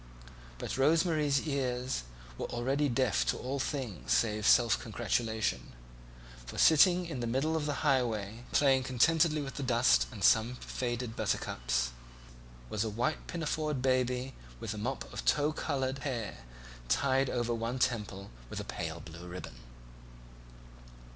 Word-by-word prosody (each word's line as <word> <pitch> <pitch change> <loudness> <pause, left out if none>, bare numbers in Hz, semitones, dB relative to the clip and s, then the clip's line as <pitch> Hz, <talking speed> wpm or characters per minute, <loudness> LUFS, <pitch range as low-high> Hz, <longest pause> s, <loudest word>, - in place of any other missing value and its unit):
But - - -4
Rose 160 +6 +4
Marie's 150 -4 +1
ears 130 - -1 0.3
were - - -4
already 135 +5 0
deaf 120 - +2
to - - +1
all 135 +2 -3
things 115 - -3
save 105 +13 +2
self 120 -2 +5
congratulation; 110 -1 -2 0.7
for - - -9
sitting 175 +3 +6
in 160 -7 -5
the 120 - -2
middle 135 +7 0
of 155 -2 -1
the 145 +1 -2
highway, 115 -5 0
playing 135 -2 +4
contentedly 150 +5 +3
with 135 - -7
the - - -3
dust 125 -2 +3
and 105 -5 -7
some 115 +6 +4
faded 120 -2 -4
buttercups, - - -1 0.8
was 105 - -1
a 110 - -2
white 120 +8 -2
pinafored 155 -4 -2
baby 130 0 +1 0.3
with 105 - -4
a 105 - -6
mop 130 +5 -2
of - - -5
tow 150 +1 +2
coloured 135 -3 -2
hair 115 - -4 0.4
tied 135 - +2
over 120 -1 -1
one 115 +2 -2
temple 105 -6 -2 0.2
with - - -5
a - - -4
pale 80 +7 -5
blue 85 +2 -10
ribbon. 90 -7 -7
125 Hz, 145 wpm, -31 LUFS, 110-140 Hz, 0.8 s, sitting